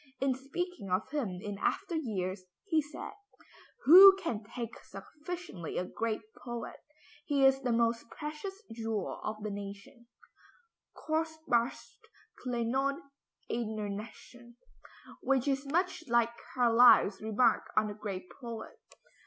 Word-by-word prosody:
In 270 0 +2
speaking 275 - -5
of 185 +7 -1
him 235 -12 -2
in 205 -1 -5
after - - -1
years, 190 - -3 0.2
he 320 -6 +2
said, 295 +1 -8 0.7
"Who 380 +6 +11
can 245 - -3
thank 230 +2 -6
sufficiently 305 - -7
a 180 - 0
great 220 +3 -3 0.2
poet? 240 -1 -6 0.5
He 280 -2 +3
is 270 0 +5
the 250 -2 0
most 230 0 +1
precious 320 +7 -7
jewel 225 -3 -3
of 215 0 -4
the 215 - -3
nation" 200 +4 -9 0.9
(kostbarste 315 -6 -2 0.4
Kleinod 255 +3 0 0.5
einer 220 -3 -2
Nation), 235 +3 -9 0.6
which 270 -1 +1
is 275 0 0
much 355 +3 0
like 235 -1 +3 0.2
Carlyle's 235 -4 +6
remark 220 +3 +2
on 215 - +5
the 205 - -4
great 200 -3 -6
poet. 235 -2 -7
240 Hz, 120 wpm, -31 LUFS, 215-285 Hz, 0.9 s, Who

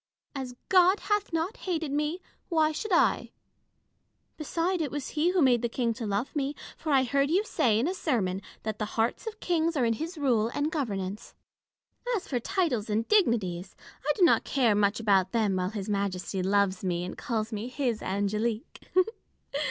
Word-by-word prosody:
As 260 -3 -5
God 370 +1 +5
hath 415 -2 +1
not 330 +6 -1
hated 330 -6 -2
me, 300 +5 -1 0.3
why 315 -3 +3
should 430 +8 -4
1 350 - +4
1 - - -12 1.1
Beside, 335 +4 -1
it 300 - -1
was 290 0 -4
he 315 +3 +1
who 360 -3 +3
made 245 -3 +4
the 235 - 0
King 235 -1 0
to 225 -1 -5
love 205 +9 -2
me; 285 0 -1 0.2
for 315 - -4
I 270 -2 +5
heard 275 +3 +1
you 370 +6 +3
say 230 - +2
in 240 +7 +1
a 365 - 0
sermon 205 - -1 0.2
that 215 -1 -3
the 215 - 0
hearts 225 - 0
of 445 0 -5
kings 335 -2 0
are 250 - +3
in 230 - +2
his 325 +8 -5
rule 245 -7 +2
and 295 +2 0
governance. 205 - -3 0.8
As 395 - -4
for 250 - -1
titles 290 - 0
and 220 +2 0
dignities, 200 - +1 0.3
I 295 - +2
do 380 - +2
not 345 - +5
care 245 -6 +2
much 205 +1 +2
about 195 -4 +2
them 215 -4 +2
while 185 0 0
His 205 -2 -5
Majesty 195 -2 -2
loves 195 0 +1
me, 175 -1 -1
and 180 - -6
calls 225 -3 -3
me 215 +3 -3
his 250 -4 -1
Ang^lique. 210 +4 -2
245 Hz, 190 wpm, -28 LUFS, 210-320 Hz, 1.1 s, God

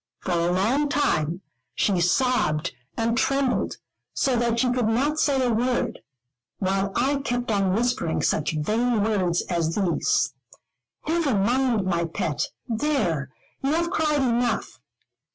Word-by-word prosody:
For 185 - -3
a 170 0 +1
long 240 +11 +1
time 175 - 0 0.3
she 190 -4 +1
sobbed 170 - +1 0.2
and 230 0 +1
trembled 270 0 0 0.4
so 265 -2 +1
that 235 -1 +1
she 250 +1 +2
could 245 -3 +1
not 280 +7 +1
say 270 -4 +2
a 240 - +1
word, 240 0 0 0.6
while 195 +1 0
I 275 +3 +2
kept 245 -4 -2
on 195 -3 +1
whispering 230 -8 0
such 155 +1 0
vain 220 +7 +1
words 185 -5 +1
as 165 -2 -1
these: 170 - +1 0.7
"Never 315 -6 +1
mind, 235 +1 +1
my 170 -2 0
pet. 160 -2 -2 0.2
There, 220 - 0 0.3
you 275 +2 +1
have 340 +1 0
cried 300 -4 +1
enough. 240 - 0
230 Hz, 135 wpm, -24 LUFS, 180-260 Hz, 0.7 s, she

